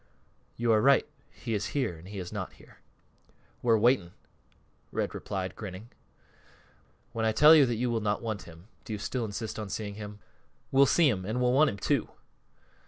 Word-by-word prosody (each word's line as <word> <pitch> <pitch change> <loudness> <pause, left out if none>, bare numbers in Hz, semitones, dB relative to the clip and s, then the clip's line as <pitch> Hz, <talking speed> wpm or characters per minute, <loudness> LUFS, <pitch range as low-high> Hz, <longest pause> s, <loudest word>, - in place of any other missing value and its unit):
"You 120 0 +1
are 110 -1 +4
right 140 +2 +4 0.2
he 115 - -6
is 105 -1 -1
here, 125 -11 0
and 80 +3 -13
he 100 +1 -8
is 90 -2 -6
not - - -5
here." - - -19 0.8
"We're 115 -2 +4
waiting," 110 -6 +2 0.8
Red - - -2
replied, 95 -2 -4
grinning. 105 +2 -8 1.2
"When 115 - -3
I 110 - +3
tell 150 +8 +7
you 145 -4 +7
that 120 - -1
you 120 +2 -1
will 115 -1 0
not 105 0 0
want 110 -4 -3
him, 85 +3 -15 0.2
do 115 - -6
you - - -2
still 115 +3 -3
insist 110 +1 -5
on 105 -2 -5
seeing 100 +1 -4
him?" 105 0 -8 0.5
"We'll 135 +1 +6
see 170 +2 +4
him, 100 -8 0
an' 110 +6 -2
we'll 125 0 +2
want 150 +3 +5
him, 100 - -5
too." 100 - 0
110 Hz, 190 wpm, -29 LUFS, 100-125 Hz, 1.2 s, tell